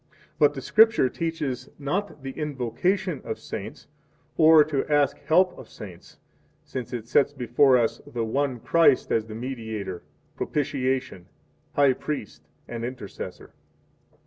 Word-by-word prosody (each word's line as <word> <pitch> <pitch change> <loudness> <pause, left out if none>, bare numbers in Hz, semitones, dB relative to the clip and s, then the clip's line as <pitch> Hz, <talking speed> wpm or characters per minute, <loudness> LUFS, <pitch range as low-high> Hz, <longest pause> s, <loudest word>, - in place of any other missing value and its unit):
But 145 0 +4
the 135 - -6
Scripture 220 - +5
teaches 160 -6 -3
not 150 +2 -3
the 135 - -4
invocation 150 - -1
of 110 - -4
saints - - -7 0.5
or 160 -1 +7
to 145 -2 -1
ask 145 -2 +2
help 180 +4 +4
of 130 - -12
saints, 95 -5 -12 0.5
since 125 -3 -6
it 115 -2 -5
sets 140 +4 +3
before 130 0 +4
us 115 -2 0
the 115 -1 -3
one 130 +2 -1
Christ 165 0 +3
as 110 -1 +1
the 110 - -8
Mediator, 110 -7 -5 0.3
Propitiation, 130 -9 -2 0.5
High 140 -2 +5
Priest, 140 -5 -6 0.2
and 115 -1 -5
Intercessor. 120 -4 -7
135 Hz, 130 wpm, -25 LUFS, 120-150 Hz, 0.5 s, or